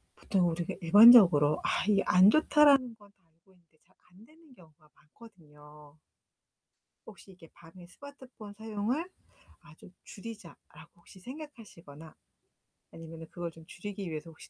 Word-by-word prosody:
보통 180 -4 -2
우리가 170 +1 -5
일반적으로 175 -6 +6
아 - - -2
이게 200 -2 +1
'안 185 +3 +5
좋다.'라는 285 -6 +2
건 205 -1 -22 0.2
알고 165 +4 -33
있는데 170 -4 -32
잘 190 - -34 0.2
안되는 265 - -22
경우가 155 -3 -24
많거든요. 150 -6 -20 1.1
혹시 200 -2 -16
이게 165 -3 -19
'밤에 175 +1 -17
스마트폰 255 -3 -15
사용을 220 +7 -5 0.6
아 170 -1 -19
좀 180 - -18
줄이자.'라고 210 -4 -14
혹시 175 +2 -19
생각하시거나 210 - -14 0.8
아니면은 165 0 -12
그걸 175 -1 -8
좀 160 0 -18
줄이기 195 +1 -9
위해서 155 +1 -8
혹시 160 - -17
185 Hz, 325 characters per minute, -28 LUFS, 165-225 Hz, 1.1 s, 일반적으로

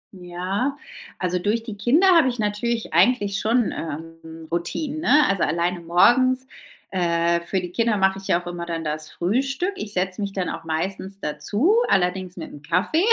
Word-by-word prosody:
Ja, 185 +9 -3 0.4
also 180 -1 -1
durch 210 +5 0
die 225 -3 -7
Kinder 250 - +3
habe 325 -5 +5
ich 245 -1 -2
natürlich 220 +1 -2
eigentlich 200 +2 +3
schon, 230 +1 +1
ähm, 160 +1 -7
Routinen, 275 - -2
ne, 300 -3 +5
also 195 -2 0
alleine 175 +3 0
morgens. 255 +10 +4 0.5
Äh, 170 -1 +1
für 190 - 0
die 180 -1 -6
Kinder 230 +2 +1
mache 190 0 +2
ich 195 - -11
ja 170 - +3
auch 175 - -14
immer 175 -1 -5
dann 165 -1 -3
das 155 0 -4
Frühstück. 270 - -1
Ich 210 - -6
setze 185 +1 -1
mich 200 -1 -2
dann 190 -2 -2
auch - - -6
meistens 190 +4 -3
dazu, 205 - +1
allerdings 180 -1 0
mit 165 - -7
'nem 145 - -11
Kaffee 190 - +1
190 Hz, 180 wpm, -23 LUFS, 170-235 Hz, 0.5 s, habe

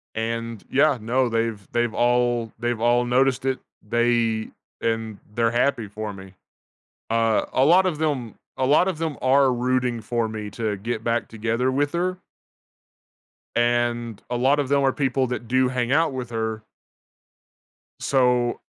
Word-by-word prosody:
And 115 -1 -3
yeah, 140 -1 +3
no, 125 +4 +1
they've 115 -3 -1
they've 120 -1 0
all 120 -1 +1
they've 120 -2 -2
all 120 +1 +3
noticed 130 +1 +2
it, 130 -1 0 0.3
they 120 -1 +1 0.3
and 115 -2 -2 0.2
they're 115 0 +2
happy 120 -2 +1
for 105 +1 -6
me. 95 -1 -12 0.8
Uh, 115 -1 +2
a 130 - +3
lot 180 +6 +5
of 175 -5 0
them 140 -8 -2 0.2
a 130 - +1
lot 150 +7 +4
of 185 -4 -1
them 160 -4 -3
are 135 0 +4
rooting 125 -1 0
for 115 +1 -1
me 105 -1 -5
to 110 -1 -2
get 115 +2 -4
back 115 0 0
together 115 +3 -1
with 145 +3 0
her. 180 +2 -1 1.4
And 120 -2 0
a 120 - 0
lot 135 +4 +3
of 140 -2 0
them 140 0 +3
are 135 -1 +3
people 135 -1 0
that 120 -2 -5
do 130 +1 +3
hang 125 0 -1
out 160 0 +3
with 125 -2 -5
her. 110 -1 -3 1.4
So 125 -2 +2
120 Hz, 155 wpm, -23 LUFS, 115-130 Hz, 1.4 s, lot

